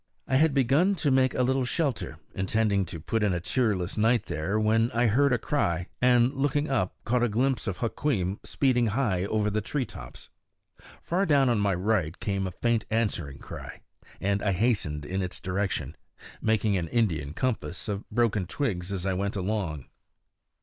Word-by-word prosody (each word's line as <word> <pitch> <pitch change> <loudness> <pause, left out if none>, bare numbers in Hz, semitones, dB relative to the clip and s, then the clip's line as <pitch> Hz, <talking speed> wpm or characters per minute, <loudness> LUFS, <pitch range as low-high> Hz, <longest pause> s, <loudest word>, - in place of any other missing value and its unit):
I 130 - +3
had 155 0 +3
begun 140 +10 +3
to 150 -6 0
make 130 0 +3
a 125 - +2
little 130 +1 +1
shelter, 140 +1 -2 0.2
intending 100 0 +1
to 85 - -7
put 110 +8 -1
in 105 -3 +2
a - - -1
cheerless 100 -2 0
night 115 +1 +3
there, 90 +8 -1
when 110 +2 +3
I 120 +1 +2
heard 135 +6 +3
a 125 - +3
cry, 90 - -1
and 125 +1 +4
looking 145 +2 0
up 110 -9 0
caught 120 +1 +1
a 120 - +2
glimpse 120 +1 0
of 95 - -2
Hukweem 110 -6 -1
speeding 125 -4 +1
high 105 -5 0
over 105 0 0
the 110 +1 0
tree 135 +5 -2
tops. 60 - -11 0.7
Far 185 +3 0
down 140 -4 +4
on 115 -3 +2
my 100 -2 +2
right 95 -3 0
came 100 -2 -1
a - - -4
faint 115 +4 0
answering 100 -11 -1
cry, - - -9 0.4
and 100 +1 0
I 100 - +1
hastened 90 -8 0
in 95 +5 -2
its 90 -1 -4
direction, 90 -7 -2 0.5
making 110 -2 +2
an 85 -2 -2
Indian 80 - 0
compass 110 -4 -3
of 105 0 -4
broken 110 -6 +1
twigs 100 - -2
as 95 -2 -3
I 95 - +1
went 100 +2 -2
along. 95 - -2
110 Hz, 180 wpm, -27 LUFS, 95-125 Hz, 0.7 s, and